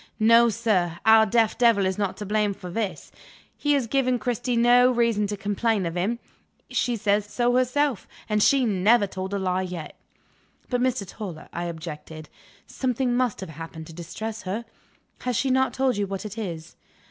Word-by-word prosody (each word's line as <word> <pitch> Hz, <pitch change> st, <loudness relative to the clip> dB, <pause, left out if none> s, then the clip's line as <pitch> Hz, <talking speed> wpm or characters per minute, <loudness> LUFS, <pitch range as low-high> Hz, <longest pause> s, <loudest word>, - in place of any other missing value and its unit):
No, 230 Hz, +2 st, +6 dB
sir; 195 Hz, -7 st, 0 dB
our 220 Hz, 0 st, +7 dB
deaf 225 Hz, +1 st, +2 dB
devil 230 Hz, -5 st, +4 dB
is 190 Hz, +1 st, -1 dB
not 200 Hz, -2 st, -1 dB
to 210 Hz, -, -6 dB
blame 210 Hz, 0 st, 0 dB
for 180 Hz, -1 st, -9 dB
this. 210 Hz, 0 st, -4 dB, 0.4 s
He 290 Hz, 0 st, +1 dB
has 275 Hz, -4 st, +1 dB
given 255 Hz, +1 st, +1 dB
Cristy 245 Hz, +1 st, -2 dB
no 245 Hz, +1 st, +6 dB
reason 230 Hz, -4 st, +1 dB
to 205 Hz, 0 st, -4 dB
complain 205 Hz, 0 st, 0 dB
of 165 Hz, 0 st, -3 dB
him. 200 Hz, +7 st, 0 dB, 0.5 s
She 245 Hz, -, 0 dB
says 205 Hz, -1 st, +1 dB
so 240 Hz, +3 st, +1 dB
herself 255 Hz, -1 st, +1 dB, 0.2 s
and 210 Hz, -1 st, +1 dB
she 270 Hz, +3 st, +4 dB
never 210 Hz, +2 st, +3 dB
told 190 Hz, 0 st, -6 dB
a 200 Hz, -, -1 dB
lie 185 Hz, -1 st, 0 dB
yet." 180 Hz, -4 st, -6 dB, 0.8 s
"But, 245 Hz, -1 st, +1 dB
Mr. 250 Hz, -6 st, 0 dB
Toller," 175 Hz, -5 st, -8 dB
I 175 Hz, +1 st, -3 dB
objected, 160 Hz, -2 st, -7 dB, 0.4 s
"something 250 Hz, -1 st, -1 dB
must 250 Hz, -5 st, 0 dB
have 190 Hz, -, -6 dB
happened 160 Hz, +1 st, -8 dB
to 165 Hz, -, -11 dB
distress 215 Hz, +7 st, -6 dB
her. 200 Hz, +5 st, -4 dB, 0.5 s
Has 250 Hz, -1 st, -2 dB
she 265 Hz, +4 st, +1 dB
not 260 Hz, 0 st, +2 dB
told 260 Hz, -3 st, 0 dB
you 200 Hz, -1 st, -1 dB
what 195 Hz, +1 st, -5 dB
it 210 Hz, -1 st, -6 dB
is?" 170 Hz, -7 st, -6 dB
215 Hz, 180 wpm, -25 LUFS, 185-240 Hz, 0.8 s, our